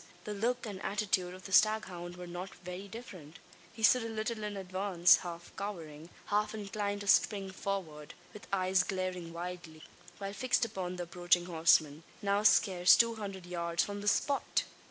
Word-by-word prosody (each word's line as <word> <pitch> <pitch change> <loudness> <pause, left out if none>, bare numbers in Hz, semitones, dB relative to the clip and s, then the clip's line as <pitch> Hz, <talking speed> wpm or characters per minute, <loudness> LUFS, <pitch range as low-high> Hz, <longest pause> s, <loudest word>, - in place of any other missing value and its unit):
The 210 - -5
look 240 +5 -1
and 200 -3 -6
attitude 195 -3 -1
of 185 - -14
the 195 - -8
staghound 190 -5 +2
were 180 - -7
not 175 +2 -7
very 180 +2 -7
different. 185 - -10 0.3
He 225 -1 -10
stood 250 +2 +6
a 230 - -4
little 220 0 -3
in 210 -1 -4
advance 185 -2 +3
half 175 -1 -8
cowering, 165 -6 -7 0.2
half 210 +1 0
inclined 205 -1 -3
to 205 - -7
spring 195 -1 +3
forward 180 -7 -5 0.2
with 210 - -11
eyes 185 -1 +2
glaring 185 -3 -3
wildly, 170 -2 -7 0.3
while 200 -1 -5
fixed 245 +3 +1
upon 185 -5 -4
the 180 - -4
approaching 175 0 +1
horseman 160 -3 +3 0.2
now 200 -1 +1
scarce 185 -4 +6
two 230 0 +3
hundred 195 -4 -6
yards 170 -1 -1
from 205 0 -5
the 205 - -6
spot! 280 +6 +1
190 Hz, 170 wpm, -32 LUFS, 175-205 Hz, 0.3 s, stood